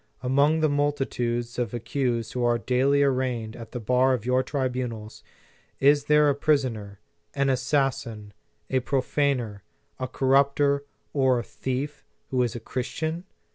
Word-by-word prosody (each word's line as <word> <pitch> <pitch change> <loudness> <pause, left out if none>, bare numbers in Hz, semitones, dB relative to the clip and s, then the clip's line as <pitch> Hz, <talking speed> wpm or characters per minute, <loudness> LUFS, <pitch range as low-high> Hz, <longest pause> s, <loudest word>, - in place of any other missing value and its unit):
Among 140 +5 +3
the 155 - +4
multitudes 130 -5 -1
of 120 -1 -2
accused 120 -2 -2
who 125 - -1
are 120 0 +3
daily 135 +4 +2
arraigned 125 -5 -1
at 115 -1 -10
the 125 - -4
bar 125 +3 +3
of 115 -3 -7
your 125 +1 +3
tribunals, 125 -6 -3 0.6
is 145 +1 +4
there 150 0 +5
a 145 - +4
poi 150 +2 +3
soner, 110 -7 -4 0.4
an 140 -1 +2
assassin, 130 -5 -1 0.3
a 130 - +1
profaner, 130 -4 0 0.4
a 130 - -2
corrupter, 140 +2 +2 0.3
or 130 -3 +3
a 120 - -2
thief, 135 +5 -4 0.3
who 130 -1 +2
is 120 -1 0
a - - -4
Christian 160 +9 -4
130 Hz, 145 wpm, -26 LUFS, 120-140 Hz, 0.6 s, there